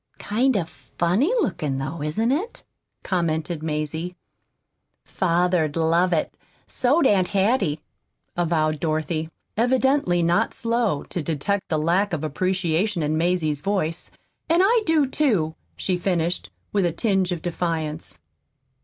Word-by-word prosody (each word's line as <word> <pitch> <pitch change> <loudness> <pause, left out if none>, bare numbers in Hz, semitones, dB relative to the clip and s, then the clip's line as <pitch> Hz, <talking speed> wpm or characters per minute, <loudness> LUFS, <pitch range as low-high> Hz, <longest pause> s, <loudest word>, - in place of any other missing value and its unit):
"Kind 245 +3 +1
of 170 -4 -1 0.3
funny 190 - +2
looking, 150 - -1
though, 145 +4 -4
isn't 190 +11 0
it?" 370 - -2 0.4
commented 165 -2 -1
Mazie. 160 +3 -3 0.9
"Father'd 175 -3 +1
love 165 +2 +2
it, 160 -3 0 0.3
so'd 275 +5 +2
Aunt 190 -6 +4
Hattie," 195 - +1 0.5
avowed 155 -3 +1
Dorothy, 155 0 -1 0.3
evidently 245 -6 +2
not 175 +7 +2
slow 230 -9 0
to 175 - -4
detect 165 +6 -2
the 155 - +1
lack 175 +6 +1
of 160 -2 -2
appreciation 180 +3 0
in 150 +1 0
Mazie's 160 -3 0
voice. 185 -4 -1 0.4
"And 340 +3 +4
I 460 +3 +4
do, 315 -3 +4
too," 220 - +1 0.2
she 185 -2 -1
finished, 175 - -1 0.2
with 195 -4 +3
a - - -1
tinge 190 0 +1
of 170 -3 -3
defiance. 165 - -3
175 Hz, 125 wpm, -23 LUFS, 160-205 Hz, 0.9 s, Aunt